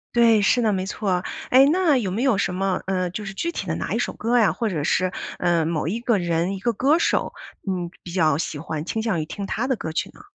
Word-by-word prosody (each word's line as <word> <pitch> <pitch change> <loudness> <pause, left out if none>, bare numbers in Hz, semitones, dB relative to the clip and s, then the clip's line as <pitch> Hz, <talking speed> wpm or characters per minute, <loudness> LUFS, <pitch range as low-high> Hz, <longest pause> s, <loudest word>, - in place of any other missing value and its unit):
对， 230 -3 +5
是 245 +5 +3
的， 220 -2 +2
没 190 -1 -1
错。 190 -3 -1 0.3
诶， 260 +2 +7
那 320 -1 +3
有 210 -7 -1
没 220 +8 -1
有 260 -7 +3
什 180 -2 -1
么 190 0 0
呃， 185 -2 -1
就 210 +4 -6
是 195 - -6
具 340 +12 -2
体 - - -5
的 - - -1
哪 - - -3
一 - - 0
首 - - -1
歌 240 +2 0
呀 220 -4 +4
或 230 -2 -1
者 160 -7 -2
是， 185 +5 +1 0.3
呃， 170 -3 +2
某 160 -1 -1
一 225 - -2
个 235 -3 +1
人 175 +1 0
一 190 - -7
个 235 - +1
歌 275 +8 +3
手， - - 0 0.3
嗯， 180 -2 -2
比 175 - -9
较 155 -5 +3
喜 155 - -3
欢， 155 0 -5
倾 220 +5 -2
向 215 -7 0
于 155 - -2
听 200 +5 -6
他 240 +6 -2
的 260 - +1
歌 160 - -5
儿 - - -4
曲 185 +4 -2
呢？ - - -15
195 Hz, 290 characters per minute, -23 LUFS, 175-235 Hz, 0.3 s, 诶